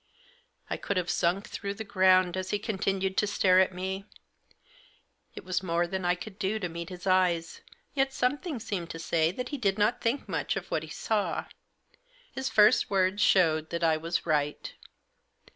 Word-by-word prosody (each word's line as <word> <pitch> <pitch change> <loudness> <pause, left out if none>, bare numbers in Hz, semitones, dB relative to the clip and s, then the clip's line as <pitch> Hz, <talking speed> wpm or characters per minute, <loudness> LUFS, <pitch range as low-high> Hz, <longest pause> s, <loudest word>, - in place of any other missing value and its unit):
I - - -3
could 200 - -3
have 175 -1 0
sunk 175 +3 0
through 200 -1 -5
the 220 - -5
ground 185 -3 +3
as 185 0 -3
he 205 - +1
continued 195 -2 -2
to 210 - +3
stare 185 -2 +4
at 190 - +3
me. 190 +2 -4 1.3
It - - -8
was 185 0 -1
more 170 -1 0
than 185 +1 -4
I 175 0 +3
could 190 +2 -10
do 210 +1 0
to 190 -4 -3
meet 170 0 -6
his 180 0 -9
eyes; 180 -3 +1 0.3
yet 270 -1 +1
something 280 +3 -1
seemed 185 -6 -4
to - - -6
say 160 0 +1
that 250 +6 -5
he 290 - -4
did 200 -4 +1
not 215 +4 +1
think 240 +4 -1
much - - -2
of - - -6
what - - 0
he - - -9
saw. - - -1 0.9
His 265 0 -3
first 215 +4 +5
words 195 +1 +1
showed 160 -6 +3
that 170 0 -3
I 160 -1 +4
was 165 +2 -2
right. 150 -3 -1
185 Hz, 185 wpm, -28 LUFS, 175-205 Hz, 1.3 s, first